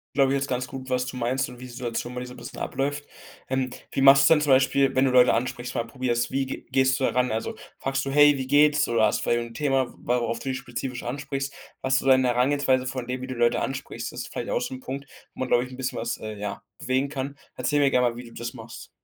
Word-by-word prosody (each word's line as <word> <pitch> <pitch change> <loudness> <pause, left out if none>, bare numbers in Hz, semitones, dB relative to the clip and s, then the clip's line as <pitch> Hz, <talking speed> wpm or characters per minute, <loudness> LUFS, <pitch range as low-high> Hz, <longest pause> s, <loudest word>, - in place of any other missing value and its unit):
Glaube 135 -1 +4
ich - - +2
jetzt 135 +1 -3
ganz 125 0 -1
gut, 130 -1 -8
was 125 0 +1
du 130 - -6
meinst 125 +2 0
und 125 -1 -11
wie - - -10
die 125 - -8
Situation 120 0 -4
bei 125 - -4
dir 125 - -6
so 125 - -10
'n - - -13
bisschen - - -9
abläuft. 145 +2 -2 0.4
Ähm. 130 -1 -1 0.2
Wie - - -1
machst 135 +1 +8
denn 160 -2 +5
zum 150 -2 +2
Beispiel, 135 +1 +4
wenn 130 +1 +3
du 130 - +2
Leute 125 0 +6
ansprichst, 125 +1 -2
mal 115 0 -2
probierst, 120 -1 -1
wie 135 0 0
ge 130 - -7
gehst 130 0 +2
du 130 - +2
da - - +1
ran? 125 -2 +1
Also, 110 +1 -3 0.2
fragst 135 0 -1
du: 135 - -3
„Hey, 145 0 +6
wie 130 - -3
geht's?“ 150 +2 +4
Oder 115 -2 +3
hast 105 - +1
vielleicht 120 - +1
'n 120 -1 -6
Thema, 135 -1 0
worauf 120 -1 -1
du 135 +3 -5
die 130 - -1
spezifisch 125 -1 -5
ansprichst? 135 +2 -4 0.3
Was 135 0 +2
du - - -7
da 135 - +8
in 130 0 +3
der 125 -1 +2
Herangehensweise 130 0 +2
von 130 -2 -4
dem, 125 0 -3
wie 130 - -5
du 130 - -5
Leute 120 0 +2
ansprichst. 135 0 -4
Das - - -6
ist - - -11
vielleicht - - -4
auch - - +1
so - - -4
'n 130 - -8
Punkt, 140 +2 -6 0.3
wo - - -16
man, 130 - -1
glaube 120 - +3
ich, 125 - -9
'n 130 - -9
bisschen 130 0 -3
was, 115 - -2
äh, 110 0 -6
ja, 105 0 -5 0.2
bewegen 130 +2 0
kann. 140 0 -5 0.2
Erzähl 130 +4 0
mir 140 -1 +4
gerne 125 -2 +3
mal, 115 - -8
wie 125 - -8
du 115 - -13
das 120 0 -5
machst. 115 -2 -10
130 Hz, 285 wpm, -25 LUFS, 120-135 Hz, 0.4 s, machst